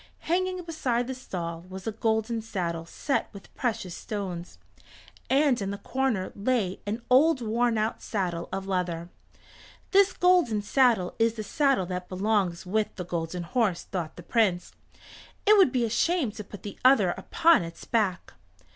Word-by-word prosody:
Hanging 370 +1 -1
beside 260 -8 -1
the 260 - -4
stall 170 -9 -5
was 190 0 -8
a 225 - -1
golden 220 +1 0
saddle 170 -6 -3
set 275 - -1
with 200 -2 -13
precious 215 -8 -2
stones, 180 - -5 0.7
and 270 -3 +3
in 195 - -2
the 200 - -4
corner 255 -6 -1
lay 205 -3 0
an 220 +3 -3
old 275 +3 +5
worn 235 0 +1
out 215 +1 -1
saddle 180 -5 -3
of 190 0 -3
leather. 180 -3 -2 0.8
"This 395 0 +5
golden 350 - +3
saddle 225 -5 +3
is 225 0 +3
the 215 - -4
saddle 275 -2 +1
that 180 0 -5
belongs 190 -2 0
with 210 +3 -1
the 180 - -5
Golden 170 0 -3
Horse," 200 -1 0
thought 175 -5 -5
the 175 - -10
Prince. 190 -3 +1 0.7
"It 425 +1 +7
would 375 -10 +6
be 245 -2 +1
a - - -2
shame 330 -1 +1
to 215 0 -8
put 205 +1 -12
the 205 - -8
other 250 -9 +5
upon 330 - +3
its 165 0 -9
back." 205 -7 0
215 Hz, 165 wpm, -27 LUFS, 180-255 Hz, 0.8 s, It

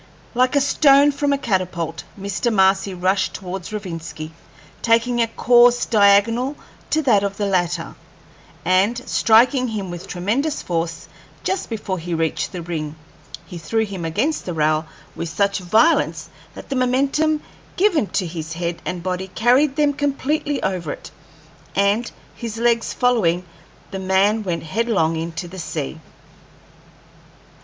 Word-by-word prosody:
Like 255 +2 +2
a 285 - +4
stone 285 0 +5
from 285 0 0
a 280 - +2
catapult, 180 - -2 0.2
Mr. 200 +5 -1
Marcy 195 -1 +3
rushed 185 +1 0
towards 185 0 -6
Rovinski, 165 -6 -6 0.5
taking 235 +1 +2
a 230 - +2
course 240 +1 +4
diagonal 225 +6 +3 0.3
to 315 0 +1
that 215 -7 +4
of 200 0 -2
the 205 - -1
latter, 175 -3 -1 0.7
and, 190 +6 +3
striking 250 +4 +4
him 205 -5 -4
with 175 +2 -8
tremendous 225 - -1
force 165 -1 -3 0.4
just 380 0 -2
before 205 -5 -3
he 170 +1 -3
reached 160 -1 -1
the 180 -3 -6
ring, 155 -3 -4 0.5
he 170 +1 -8
threw 220 +8 0
him 195 -4 -6
against 275 - -1
the 175 - -4
rail 155 0 +1 0.3
with 170 - -4
such 200 +5 0
violence 220 - +2 0.2
that - - -10
the 275 - -2
momentum 275 +5 +1 0.3
given 355 - +3
to 190 - -1
his 160 -1 -5
head 170 0 -3
and 180 -2 -4
body 185 +1 -2
carried 250 +8 +2
them 295 -1 +2
completely 290 +1 -1
over 180 -5 -2
it, - - -11 0.6
and 200 +4 +1 0.2
his 230 -2 -6
legs 230 0 +1
following, 185 -8 +1 0.5
the 190 - -4
man 190 +3 +2
went 175 -5 -3
headlong 190 -2 0
into 165 +2 -4
the 185 +2 -9
sea. 65 - -4
200 Hz, 145 wpm, -21 LUFS, 175-245 Hz, 0.7 s, stone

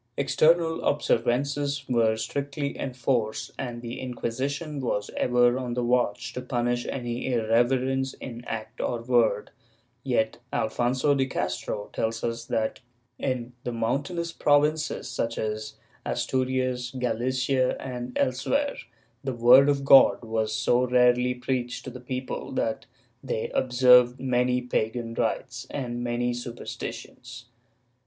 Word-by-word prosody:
External 160 +3 +3
observances 140 +1 0
were 115 -3 +2
strictly 140 +5 -3
enforced, 125 -4 -1
and 120 -2 -5
the 120 0 -5
Inquisition 135 +4 -3
was 105 -5 -2
ever 125 0 +3
on 125 -2 -3
the 125 - 0
watch 125 0 0
to 125 - -4
punish 120 -1 -1
any 120 0 -3
irreverence 125 +3 +1
in 120 -2 -8
act 110 -2 -5
or 120 -2 -2
word, 115 -4 +2 0.5
yet 120 -4 0
Alfonso 125 +5 +1
de 135 -1 +1
Castro 105 -5 -3
tells 115 0 -2
us 115 0 -2
that, 110 -1 -1 0.4
in 125 -2 -2
the 120 - -3
mountainous 145 +9 -2
provinces, 150 0 +1
such 115 0 -2
as 110 0 -3 0.3
Asturias, 130 -1 -1
Galicia 130 +2 0
and 125 -1 -5
elsewhere, 275 - 0 0.5
the 135 -1 -2
word 125 +4 +7
of 140 -1 +1
God 135 -2 +7
was 110 -1 -1
so 120 +3 +2
rarely 125 0 +3
preached 125 -1 -3
to 130 - -6
the 125 - -9
people 130 +2 -5
that 110 -4 -2 0.4
they 125 -4 -2
observed 125 0 +5
many 125 -1 +1
pagan 115 -1 -2
rites - - -2
and 120 -3 -4
many 120 0 0
super 120 0 -7
stitions. 120 0 -7
125 Hz, 125 wpm, -26 LUFS, 120-130 Hz, 0.5 s, word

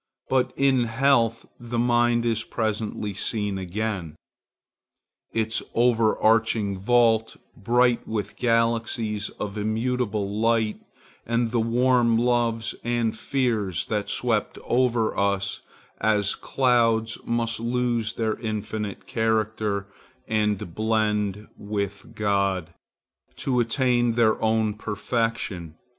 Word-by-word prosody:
But 130 -1 +2
in 135 -3 +3
health 115 -1 +2
the 120 0 -5
mind 120 0 +2
is 115 -1 +1
presently 105 -2 -2
seen 100 0 -2
again,—its 105 +3 -6
overarching 115 -3 +2
vault, 115 +1 +3 0.2
bright 120 +2 +2
with 110 -2 -3
galaxies 115 -2 0
of 105 0 -4
immutable 110 -1 -1
lights, 115 -1 +1 0.4
and 115 0 0
the 120 - +1
warm 120 0 +3
loves 120 -1 +1
and 120 -2 0
fears 110 -8 -1
that 105 -2 -1
swept 115 -4 0
over 120 -3 +1
us 100 -1 0 0.4
as 105 -1 +2
clouds 115 -3 +1
must 115 -1 -1
lose 120 -1 0
their 110 -2 -1
finite 110 -2 -4
character 110 -2 0 0.4
and 105 -5 0
blend 105 -1 0
with 100 -1 -5
God, 100 -4 0 0.6
to 125 -2 0
attain 120 0 +2
their 115 -2 +2
own 110 -1 +2
perfection. 105 -5 -3
110 Hz, 100 wpm, -25 LUFS, 105-120 Hz, 0.6 s, in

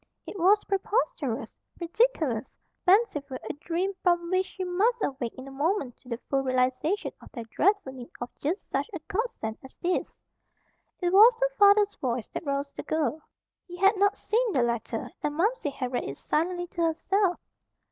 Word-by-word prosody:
It - - -8
was 400 +5 +5
preposterous, 390 - -1 0.2
ridiculous, 330 - 0 0.3
fanciful, 360 - +3
a - - -2
dream 345 +6 -2
from 345 -1 +2
which 375 0 +2
she 375 - -6
must 410 +6 +1
awake 265 -4 -2
in 260 +1 -8
a - - -9
moment 285 - -1
to 250 - -18
the 235 - -2
full 275 -1 +1
realization 260 +8 0
of - - -14
their 235 - -5
dreadful 330 - +1
need 250 -2 -9
of 240 0 -5
just 335 +8 -2
such - - -2
a 350 - -4
godsend 405 - -3
as 265 - -13
this. 355 0 -2 0.8
It 355 0 +1
was 455 +4 +8
her - - +1
father's 405 0 +6
voice 245 -3 -2
that - - -6
roused 280 0 -2
the - - -2
girl. 315 0 -1 0.5
He 355 -1 -9
had 390 +3 +5
not 405 +1 +2
seen 460 -1 0
the 250 - +3
letter 235 -1 -2
and 295 0 -2
Momsey 400 0 +1
had 255 -3 -4
read 245 - -1
it 140 - -6
silently 350 +3 -1
to 345 0 -5
herself. 355 +3 +1
345 Hz, 175 wpm, -27 LUFS, 270-400 Hz, 0.8 s, was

